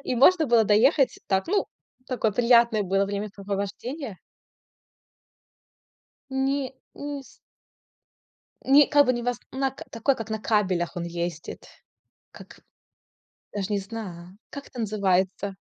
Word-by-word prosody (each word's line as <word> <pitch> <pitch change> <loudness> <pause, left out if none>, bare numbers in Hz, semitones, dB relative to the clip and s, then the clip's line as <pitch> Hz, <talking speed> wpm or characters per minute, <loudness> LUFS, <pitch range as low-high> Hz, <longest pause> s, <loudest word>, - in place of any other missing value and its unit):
И 255 - -1
можно 320 +5 +5
было 230 -3 +4
доехать 255 +7 +3
так, 190 -1 +1
ну, 400 +4 +1 0.4
такое 235 -4 0
приятное 235 -2 +4
было 195 +1 +1
времяпрепровождение. 200 - -5 2.1
Не 265 0 -1 0.2
не 285 -1 -6
с - - -19 1.3
не 280 +1 +6
как 290 -1 +5
бы 255 - +3
не 240 -1 -3
вас 245 0 -1
на 265 +1 0
к 265 - -11
такой, 260 +4 +1
как 225 -1 -7
на 220 - -1
кабелях 190 -5 0
он 175 - -3
ездит. 170 -1 -5 0.6
Как - - -14 0.9
даже 205 0 -3
не 205 - +1
знаю. 190 -3 -8
Как 280 -1 -9
это 250 - -10
называется? 195 -2 0
220 Hz, 125 wpm, -25 LUFS, 195-265 Hz, 2.1 s, не